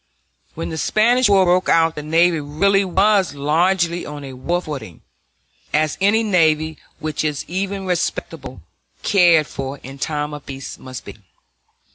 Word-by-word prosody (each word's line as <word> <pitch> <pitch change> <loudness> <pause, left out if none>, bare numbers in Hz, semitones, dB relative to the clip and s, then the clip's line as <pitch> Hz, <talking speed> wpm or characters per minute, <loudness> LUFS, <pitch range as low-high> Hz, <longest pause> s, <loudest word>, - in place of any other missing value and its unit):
When - - -4
the 160 - -4
Spanish 240 - +3
War 195 -2 +5
broke 180 +1 +2
out 165 -1 +4
the 150 - -6
navy 165 +2 +2
really 195 +8 +1
was 195 -2 +2
largely 170 +4 +1
on 145 -1 -8
a 135 -1 -8
war 170 +8 -1
footing, 140 - -8 0.7
as 155 0 +1
any 215 +3 +3
navy 160 -6 +1 0.2
which 155 -1 -3
is 150 -2 -2
even 195 +2 -3
respectably 180 -2 -3 0.4
cared 175 -6 +4
for 135 0 -6
in 135 +2 -10
time 150 +1 -2
of 150 -1 -8
peace 135 -1 -8
must 130 -1 -9
be. - - -10
165 Hz, 150 wpm, -20 LUFS, 150-190 Hz, 0.7 s, War